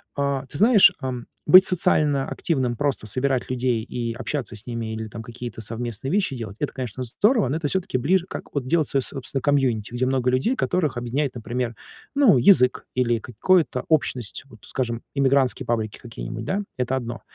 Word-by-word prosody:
А 140 -1 -1
ты 140 - -8
знаешь, 210 - +7
эм, 125 -3 -4 0.2
быть 185 +5 +9
социально 150 -6 +1
активным, 130 -8 -1
просто 135 -3 -1
собирать 130 +3 0
людей 125 -2 0
и 120 -1 -4
общаться 130 -1 -4
с 105 - -7
ними 115 -2 -4
или 110 0 -5
там 115 +1 -8
какие-то 120 0 -8
совместные 115 +2 -4
вещи 190 -7 0
делать 110 -4 -7
это, 145 - -2
конечно, 130 -2 -5
здорово, 210 - +2
но 150 - 0
это 160 -2 -2
всё-таки 190 -2 -1
ближе 175 +8 +1
как - - -8
вот 140 -3 -2
делать 160 +1 +2
своё, 135 - +1
собственно, 135 0 -3
комьюнити. 125 -6 +1
Где 125 +1 0
много 130 -1 +1
людей, 130 - +1
которых 160 - 0
объединяет, 125 +4 -2
например, 120 0 -3 0.4
ну, 270 - +5
язык 125 -3 +5
или 120 -2 +1
какое-то 155 - +1
общность, 130 -8 0
вот 120 -6 -17
скажем, 120 -3 -3
эмигрантские 135 -1 +2
паблики 110 -3 -2
какие-нибудь, 115 -1 -7
да, 195 - -1 0.2
это 125 +1 -1
одно. 120 -2 -5
130 Hz, 180 wpm, -23 LUFS, 120-145 Hz, 0.4 s, быть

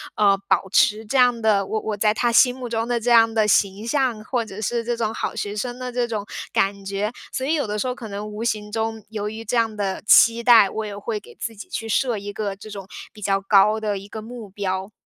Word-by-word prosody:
呃， 200 -2 +4
保 190 0 +2
持 210 +2 +3
这 240 +6 -1
样 245 -2 +4
的 210 -3 +2
我 220 - -2
我 215 - -3
在 210 +1 +3
他 240 +2 +1
心 250 +2 +5
目 255 -1 -6
中 225 -1 -2
的 240 -1 0
这 240 +2 0
样 225 -1 +6
的 220 -1 +2
形 200 +1 +1
象， 245 -4 0
或 245 +1 -1
者 205 -2 -9
是 235 +2 -1
这 240 +1 -1
种 220 -1 -1
好 - - -3
学 205 0 -4
生 245 +3 -4
的 250 0 -5
这 245 0 -1
种 215 -3 -4 0.3
感 200 0 0
觉， 200 +2 -2 0.2
所 260 - -3
以 300 - +1
有 295 -7 0
的 210 0 -3
时 235 - -1
候 250 - -1
可 240 -2 -9
能 205 0 -6
无 210 +1 -6
形 210 -3 -2
中 225 0 -3
由 210 -1 -4
于 220 +1 -8
这 235 - -2
样 225 -2 +1
的 200 -2 -2
期 230 +2 +6
待， 230 -4 +7
我 220 +2 -4
也 205 -1 -6
会 210 +1 -3
给 - - -16
自 230 - -5
己 205 - -10
去 225 - -4
设 235 +1 +1
一 205 0 -7
个 200 -2 -3
这 200 +2 -12
种 195 -2 -8 0.3
比 210 - -14
较 195 -1 +1
高 205 +2 +4
的 210 -2 -2
一 195 - -12
个 220 +1 -7
目 225 -1 -9
标。 190 0 -3
215 Hz, 280 characters per minute, -22 LUFS, 205-235 Hz, 0.3 s, 待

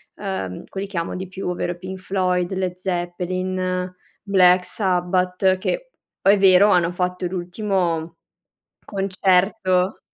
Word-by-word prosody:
ehm, 190 - -4
quelli 195 +1 -5
che 195 -3 -7
amo 170 - -2
di 185 0 -5
più, 190 0 -6
ovvero 175 0 -2
i 175 - -7
Pink 185 +1 -7
Floyd, 185 -1 0
Led 185 -1 -2
Zeppelin, 185 0 -2 0.3
Black 185 -3 +4
Sabbath, 185 -1 +1
che - - -3 0.3
poi 195 - +6
è - - +3
vero, 195 +1 +6
hanno 175 -3 +3
fatto 180 0 -2
l'ultimo 175 -3 -2 0.7
concerto 190 -1 +1
185 Hz, 130 wpm, -22 LUFS, 180-190 Hz, 0.7 s, poi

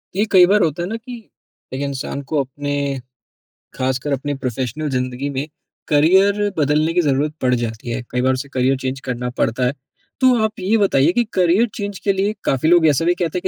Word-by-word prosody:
ये 205 - +2
कई 180 -2 +8
बार 205 +2 +3
होता 165 +1 -1
है 175 - -4
ना 225 - -3
कि, 235 -1 -11 0.4
एक 130 - -3
इंसान 140 0 -4
को 155 - +1
अपने 140 +1 -3 0.7
ख़ासकर 130 +2 -2
अपनी 145 +2 -2
प्रोफ़ेशनल 130 +3 -3
ज़िंदगी 130 +1 -2
में 135 +3 -2 0.4
करियर 190 +7 +3
बदलने 155 +2 +2
की 175 - +3
ज़रूरत 145 0 0
पड़ 125 -1 +2
जाती 115 0 -4
है। 120 +2 -2
कई 125 - 0
बार 130 +1 +2
उसे 135 +2 -5
करियर 130 +1 +2
चेंज़ 130 0 -4
करना 125 -1 -3
पड़ता 120 +3 0
है। 125 - 0 0.5
तो 255 -1 +5
आप 220 -1 -2
ये 195 +4 +2
बताइए 170 -7 +3
कि 240 +6 +2
करियर 185 +6 +3
चेंज 205 -1 -4
के 200 - +1
लिए 195 +2 0
काफ़ी 135 +4 +1
लोग 175 -1 +5
ऐसा 150 +2 +2
भी 175 - +4
कहते 175 -1 -2
हैं - - -2
145 Hz, 205 wpm, -19 LUFS, 130-185 Hz, 0.7 s, कई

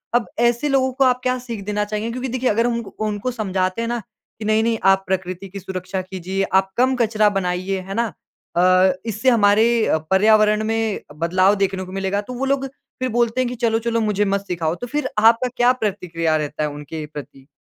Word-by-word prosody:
अब 240 -2 +3
ऐसे 240 +4 +2
लोगों 265 -1 +2
को 270 - +2
आप 250 -1 +3
क्या 255 0 +1
सीख 235 -5 -7
देना 210 0 -1
चाहेंगे? 215 +2 -3
क्योंकि 255 +2 -4
देखिए 255 +1 0
अगर 230 +3 +2
हम 240 - 0
उनक 215 -3 -11
उनको 210 +4 -2
समझाते 190 -3 -1
हैं 230 - -2
ना 240 0 -1 0.4
कि 215 - -5
नहीं, 215 +1 +2
नहीं 230 0 +1
आप 195 0 +4
प्रकृति 185 0 -3
की 200 +1 -7
सुरक्षा 185 0 -4
कीजिए, 185 +1 -3
आप 190 0 +1
कम 260 +2 +3
कचरा 215 -2 +3
बनाइए, 185 +1 -2
है 195 - -5
ना, 235 +2 0 0.5
अ, 185 +1 +5
इससे 225 +3 +1
हमारे 225 0 +4
अ, - - +2
पर्यावरण 215 +2 +4
में 225 -1 -1 0.2
बदलाव 185 +4 +3
देखने 195 -1 -1
को 185 - -11
मिलेगा 195 +1 -1
तो 250 +5 -8
वो 255 +2 -2
लोग 270 0 0 0.3
फ़िर 255 - 0
बोलते 235 +1 +1
हैं 255 - 0
कि 250 - -5
चलो-चलो 230 0 0
मुझे 210 -1 +1
मत 200 0 0
सिखाओ। 165 -2 -1
तो 245 - -4
फ़िर 295 +4 -2
आपका 230 +3 +5
क्या 245 +1 +5
प्रतिक्रिया 180 -8 -1
रहता 150 0 -3
है 150 - 0
उनके 150 +2 -7
प्रति? 135 -2 -10
210 Hz, 210 wpm, -21 LUFS, 190-235 Hz, 0.5 s, अ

